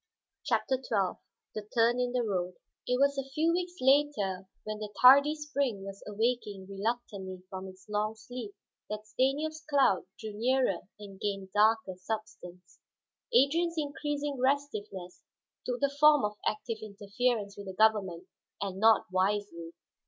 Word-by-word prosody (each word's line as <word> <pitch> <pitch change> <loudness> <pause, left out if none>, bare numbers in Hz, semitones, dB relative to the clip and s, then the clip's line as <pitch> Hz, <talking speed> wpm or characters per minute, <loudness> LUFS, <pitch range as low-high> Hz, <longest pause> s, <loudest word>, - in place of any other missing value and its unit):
CHAPTER 265 - +1
XII 215 -7 -1 0.3
THE 210 -1 -6
TURN 235 +1 +4
IN 250 0 0
THE 250 -1 0
ROAD 185 -4 -2 0.3
It 250 0 +1
was 280 0 +3
a 270 0 -5
few 325 +2 +3
weeks 355 0 -2
later, 255 -9 +2 0.2
when 215 0 -5
the 210 -1 -5
tardy 280 +4 +8
spring 280 -9 -2
was 195 0 -8
awaking 210 -2 -1
reluctantly 195 -3 -4
from 190 0 -6
its 185 0 -14
long 210 +1 -1
sleep, 225 -3 -8 0.3
that 210 0 -5
Stanief's 280 +8 -1
cloud 280 -11 +2
drew 220 -1 -6
nearer 240 -3 +1 0.2
and 200 -2 -11
gained 195 -2 -3
darker 215 -1 +3
substance. 185 -3 -7 0.5
Adrian's 335 - +3
increasing 290 -2 -2
restiveness 215 -10 -2 0.5
took 250 -1 -1
the 280 0 0
form 300 -4 +6
of 210 0 -3
active 220 +1 -2
interference 205 +1 -2
with 200 -1 -9
the 190 - -5
government, 190 -5 +2 0.3
and 195 -1 -4
not 220 +1 +5
wisely. 185 -3 -1
220 Hz, 145 wpm, -30 LUFS, 195-270 Hz, 0.5 s, tardy